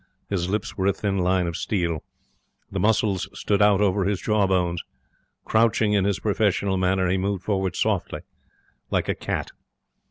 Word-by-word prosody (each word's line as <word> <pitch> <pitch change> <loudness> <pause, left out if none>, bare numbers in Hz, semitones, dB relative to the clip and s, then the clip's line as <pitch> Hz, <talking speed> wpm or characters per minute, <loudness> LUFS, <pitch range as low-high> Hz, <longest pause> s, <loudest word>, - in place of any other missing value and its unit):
His 90 -2 -1
lips 105 +3 -2
were 95 0 0
a 100 - +3
thin 100 -2 -2
line 90 0 +2
of 85 -1 -3
steel. 85 -6 -1 0.7
The - - -2
muscles 105 -3 +1
stood 100 -1 0
out 105 -1 +5
over 100 -1 +2
his 100 -1 0
jaw 105 -3 +1
bones. 90 -3 0 0.6
Crouching 110 -1 +2
in 100 -2 +2
his 100 -1 0
professional 100 -2 +1
manner, 95 0 +1
he 95 +2 +1
moved 95 -1 -2
forward 95 -3 -1
softly, 105 -5 -1 0.7
like - - 0
a - - +3
cat. - - -4
95 Hz, 165 wpm, -24 LUFS, 95-105 Hz, 0.7 s, out